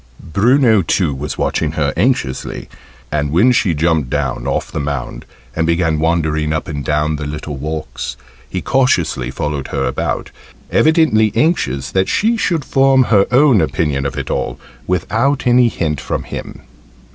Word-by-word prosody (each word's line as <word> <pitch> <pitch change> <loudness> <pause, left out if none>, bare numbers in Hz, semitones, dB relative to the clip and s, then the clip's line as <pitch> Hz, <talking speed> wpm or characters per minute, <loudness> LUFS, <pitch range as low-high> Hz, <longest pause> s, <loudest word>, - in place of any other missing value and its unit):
Bruno 115 0 +4
too 85 -3 0
was 70 +3 -5
watching 75 -1 -1
her 75 -4 0
anxiously, 90 - -1 0.4
and 75 -1 0
when 95 - +4
she 110 -9 +2
jumped 80 -3 +1
down 70 -2 -2
off - - -2
the - - -3
mound, 70 -4 -4 0.3
and 80 0 0
began 85 -2 +1
wandering 80 -2 0
up 80 - -3
and 75 -3 -4
down 75 +2 0
the 75 0 -5
little 75 0 -5
walks, 65 -4 -5 0.3
he 90 -3 -4
cautiously 85 - +1
followed 75 0 -3
her - - -2
about, - - -2 0.4
evidently 155 -10 +3
anxious 70 - 0
that 95 0 +1
she 225 +3 +2
should 170 -10 -1
form 135 -1 +4
her 100 -5 +3
own 125 - +5
opinion 75 -3 -1
of 70 +1 -6
it 70 - -4
all, - - -2 0.3
without 115 +10 0
any 125 0 +5
hint 75 - -2
from - - -3
him. - - -8
80 Hz, 160 wpm, -17 LUFS, 75-120 Hz, 0.4 s, own